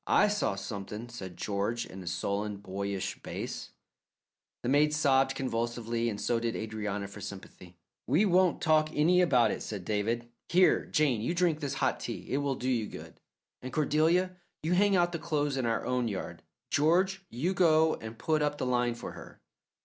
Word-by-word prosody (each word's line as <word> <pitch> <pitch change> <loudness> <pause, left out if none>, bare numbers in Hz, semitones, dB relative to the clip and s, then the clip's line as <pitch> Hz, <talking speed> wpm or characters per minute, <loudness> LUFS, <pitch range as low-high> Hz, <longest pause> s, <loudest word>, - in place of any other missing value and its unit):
"I 210 - +5
saw 205 - 0
something," 105 +3 -6
said 95 -7 -8
George, 105 +4 -1
in 95 - -9
a 90 - -10
sullen, 100 +3 -2
boyish 100 0 -4
bass. - - -5 0.9
The 120 - -1
maid 150 +2 +4
sobbed 135 -3 +3
convulsively 120 -2 -1
and 105 -2 -4
so 120 +2 +1
did 115 -1 -2
Adrianna 105 -2 -3
for 100 +1 -11
sympathy. 95 -3 -10 0.3
"We 160 +11 +4
won't 185 -2 +3
talk 155 -1 +4
any 170 +4 +4
about 125 - +4
it," - - -4
said 100 -5 -5
David. 115 +4 -1 0.2
"Here, 180 +1 +4
Jane, 145 -9 +2
you 170 +10 -1
drink 170 -3 +2
this 145 -3 -3
hot - - 0
tea - - -5
it 135 - +1
will 140 -1 0
do 125 - -4
you 120 -5 +1
good; - - -10 0.4
and 130 - -6
Cordelia, 160 +5 +2 0.3
you 165 +3 +1
hang 200 +2 +4
out 175 -1 +3
the 170 - -3
clothes 150 -4 -1
in 130 -3 0
our 115 - 0
own 125 -1 0
yard. 100 -4 -5 0.3
George, 185 +6 +2
you 155 +11 -1
go 160 -3 +4
and 110 0 -7
put 155 +4 +1
up 145 0 0
the - - -2
line 120 -1 +1
for - - -7
her." - - -12
125 Hz, 185 wpm, -30 LUFS, 110-155 Hz, 0.9 s, I